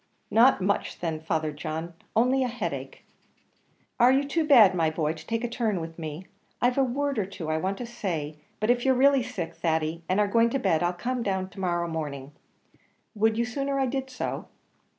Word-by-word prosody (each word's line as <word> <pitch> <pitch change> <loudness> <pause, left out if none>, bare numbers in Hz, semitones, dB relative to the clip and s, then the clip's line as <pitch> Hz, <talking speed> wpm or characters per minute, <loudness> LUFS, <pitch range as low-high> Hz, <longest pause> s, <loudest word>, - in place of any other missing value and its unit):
"Not 240 0 +5
much, 200 +2 -1
then, 165 -2 -2
Father 160 -1 -1
John; 160 +3 -5 0.2
only 255 +4 +3
a - - 0
headache." 245 0 -5 0.9
"Are 245 +1 +7
you 275 +2 +2
too 325 +3 +1
bad, 240 -11 +7
my 165 -3 +2
boy, 155 -1 -1
to 160 0 -13
take 230 0 -1
a - - 0
turn 230 -5 -1
with 165 0 -7
me? 160 +2 -6 0.3
I've 245 +2 +2
a - - +5
word 275 0 -1
or 200 - 0
two 180 -5 -6
I 155 - +1
want 190 +3 -2
to 245 - -5
say; 170 -11 -4 0.2
but 215 +3 +3
if 245 0 +1
you're 265 -1 +3
really 275 +1 +5
sick, 220 -9 -5
Thady, 160 0 -1
and 185 +3 +2
are 210 - +3
going 230 +3 +3
to 270 - 0
bed, 160 -10 +1
I'll 175 0 +2
come 245 +8 -3
down 195 -4 0
early 185 - -8
to - - -11
morrow 175 -2 0
morning. 145 -4 -5 0.8
Would 220 0 +2
you 235 - +1
sooner 275 +3 -2
I 270 - +2
did 265 +1 -3
so?" 255 - -4
205 Hz, 210 wpm, -27 LUFS, 165-250 Hz, 0.9 s, Are